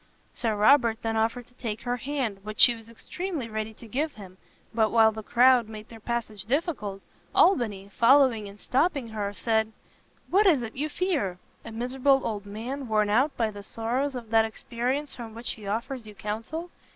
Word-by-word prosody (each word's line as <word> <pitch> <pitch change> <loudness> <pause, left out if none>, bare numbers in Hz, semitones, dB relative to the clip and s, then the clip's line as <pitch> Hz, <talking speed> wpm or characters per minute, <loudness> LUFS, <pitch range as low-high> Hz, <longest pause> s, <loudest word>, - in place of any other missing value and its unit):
Sir 225 -4 -1
Robert 230 +1 +4
then 225 0 -1
offered 230 +2 0
to 245 - -24
take 225 -4 -5
her 245 0 -2
hand, 250 -5 -3
which 215 0 -7
she 240 - +9
was 225 -1 -12
extremely 320 - -5
ready 220 0 -4
to 230 - -13
give 290 +7 -1
him; 190 -3 -12 0.3
but 220 -1 +3
while 225 -1 +5
the 220 0 -7
crowd 245 +1 +4
made 215 -1 -9
their 225 - -11
passage 220 -3 -4
difficult, 240 - -2 0.3
Albany, 215 - +3
following 235 -3 +4
and 200 +1 -14
stopping 275 - 0
her, 210 -2 -3
said, 220 +1 0 0.6
"What 400 +3 +5
is 295 -9 +4
it 220 - -7
you 300 +3 -2
fear? 290 - -1 0.3
a 230 - -8
miserable 260 +4 +1
old 205 -3 -3
man, 245 +6 -5
worn 215 -2 +2
out 270 +6 +2
by 225 -2 +1
the 205 -1 -9
sorrows 245 +7 -2
of 230 -3 -7
that 225 -1 +5
experience 250 +5 -3
from 225 -3 -8
which 230 +1 -3
he 210 -3 -8
offers 235 +3 -3
you 210 - -11
counsel? 230 - -5
230 Hz, 190 wpm, -27 LUFS, 215-265 Hz, 0.6 s, she